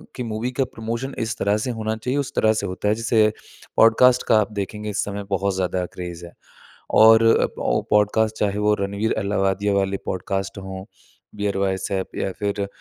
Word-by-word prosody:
कि 125 - -4
मूवी 115 +2 -3
का - - +5
प्रमोशन 115 +4 -4
इस 115 -1 -2
तरह 100 +1 +1
से 125 - -1
होना 110 -1 -2
चाहिए, 125 +5 -2
उस 140 - -3
तरह 110 0 +3
से 105 -2 -2
होता 95 +2 -3
है। 105 - +3
जिसे 110 -1 +2 0.5
पॉडकास्ट 125 +3 +5
का 110 - +5
आप 105 - -1
देखेंगे 105 +2 -5
इस 100 - -1
समय 100 0 -5
बहुत 100 0 0
ज़्यादा 90 -1 -1
क्रेज़ 85 -1 -7
है 85 - -13 0.7
और 110 +1 +8
अ - - +2 0.2
औ - - +1
पॉडकास्ट 110 +1 +2
चाहे 105 0 0
वो 105 0 +3
रणवीर 100 +3 -1
अलाहाबादिया 100 0 0
वाले 100 0 +1
पॉडकास्ट 95 +1 -3
हो। 95 0 -7 0.5
बीयर 100 -1 -2
बाइसेप 95 0 -2
या 95 - -1
फिर 100 -1 -2
105 Hz, 185 wpm, -22 LUFS, 95-110 Hz, 0.7 s, और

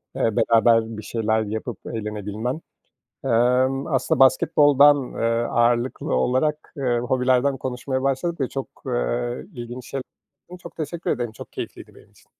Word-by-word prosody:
eee, 115 - 0
beraber 115 -1 +3
bir 105 - -7
şeyler 110 0 0
yapıp 110 +1 -4
eğlenebilmen. 105 +5 -4 0.6
Emm, 130 +3 +2
aslında 135 -5 0
basketboldan, 145 0 +6
ııı, 115 -3 -1
ağırlıklı 120 +2 +1
olarak, 130 - 0
ııı, 125 -3 +1
hobilerden 130 +2 +2
konuşmaya 130 +1 -3
başladık 140 +5 -1
ve 130 - 0
çok, 135 -1 -4 0.2
eee, - - -2
ilginç 120 0 -7
şeyler 135 -1 -3 0.6
Çok - - -11
teşekkür 165 +2 -3
ederim, 120 -3 -2
çok - - -11
keyifliydi - - -8
benim - - -19
için. - - -24
125 Hz, 135 wpm, -23 LUFS, 115-135 Hz, 0.6 s, basketboldan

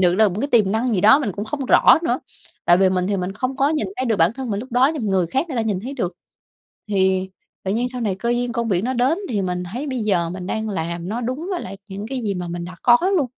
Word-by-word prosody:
được 180 -1 +4
là 215 +1 +4
một 195 +4 -4
cái 285 - -1
tiềm 210 -6 +3
năng 230 +2 0
gì 185 - +1
đó, 220 +8 +7
mình 215 -10 -2
cũng 205 - -5
không 275 +4 -4
rõ - - +6
nữa, - - 0 0.4
tại 175 - +6
vì 190 - +5
mình 180 -1 0
thì 205 - 0
mình 185 +1 -3
không 255 +5 -3
có 275 +2 +3
nhìn 310 0 0
thấy 260 - -1
được 225 - +1
bản 170 +3 +3
thân 260 -1 -5
mình 205 0 -1
lúc 255 0 -10
đó, 255 +4 +4
nhưng 295 - -4
mà - - 0
người 185 -3 +2
khác 270 - -1
người 265 - -4
ta 230 - +1
nhìn 205 -4 -1
thấy 255 +7 -6
được. 185 -9 -2 0.8
Thì 190 -1 +1 0.3
tự 190 - -1
nhiên 240 +4 0
sau 250 - -5
này 205 -5 0
cơ 235 +5 -2
duyên 240 0 0
công 235 0 -1
việc 190 +1 +1
nó 260 - 0
đến, 260 +8 +2
thì 205 -5 -1
mình 180 -1 -2
thấy 260 +6 -4
bây 260 -3 -3
giờ 175 -6 +1
mình 180 0 -6
đang 220 +2 -2
làm 170 -1 -3
nó 225 +3 -2
đúng 255 +8 -3
với 360 -3 -2
lại 195 +1 -7
những 200 +2 -5
cái 265 -1 -3
gì 205 -3 -1
mà 180 -1 -4
mình 170 0 -4
đã 180 0 -8
có 240 -1 +7 0.2
luôn. 295 -7 +2
215 Hz, 305 wpm, -21 LUFS, 190-250 Hz, 0.8 s, đó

